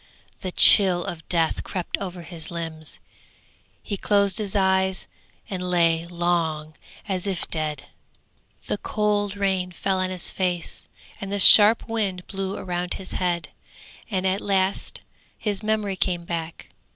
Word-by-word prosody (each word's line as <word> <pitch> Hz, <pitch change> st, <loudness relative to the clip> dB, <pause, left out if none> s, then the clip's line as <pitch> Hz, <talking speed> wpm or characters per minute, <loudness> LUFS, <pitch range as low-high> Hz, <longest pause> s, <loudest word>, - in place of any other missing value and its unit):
The 185 Hz, -, -5 dB
chill 180 Hz, -2 st, +7 dB
of 165 Hz, -3 st, -8 dB
death 165 Hz, -2 st, 0 dB
crept 180 Hz, -3 st, -4 dB
over 180 Hz, -3 st, -7 dB
his 165 Hz, -2 st, -7 dB
limbs; 165 Hz, -2 st, -6 dB, 0.9 s
he 200 Hz, -, -4 dB
closed 200 Hz, +1 st, +1 dB
his 210 Hz, -1 st, -3 dB
eyes 190 Hz, -1 st, +1 dB, 0.4 s
and 180 Hz, -2 st, -5 dB
lay 170 Hz, -1 st, +1 dB
long 170 Hz, -3 st, -2 dB, 0.3 s
as 190 Hz, -1 st, -2 dB
if 190 Hz, -3 st, -2 dB
dead. 155 Hz, -3 st, -2 dB, 0.8 s
The 205 Hz, -, -3 dB
cold 205 Hz, -1 st, -1 dB
rain 190 Hz, -2 st, -1 dB
fell 190 Hz, +1 st, -2 dB
on 185 Hz, 0 st, -1 dB
his 185 Hz, -2 st, -2 dB
face, 180 Hz, -3 st, -2 dB, 0.3 s
and 195 Hz, 0 st, -6 dB
the 205 Hz, -, -1 dB
sharp 210 Hz, +3 st, +9 dB
wind 200 Hz, -6 st, -2 dB
blew 195 Hz, 0 st, -5 dB
around 180 Hz, 0 st, -4 dB
his 190 Hz, -, -9 dB
head, 175 Hz, -2 st, -2 dB, 0.6 s
and 190 Hz, -3 st, -2 dB
at 190 Hz, +1 st, 0 dB
last 195 Hz, -1 st, -1 dB, 0.4 s
his 205 Hz, -2 st, -3 dB
memory 215 Hz, -2 st, -1 dB
came 175 Hz, -2 st, -2 dB
back. 165 Hz, -1 st, -6 dB
185 Hz, 140 wpm, -23 LUFS, 175-195 Hz, 0.9 s, sharp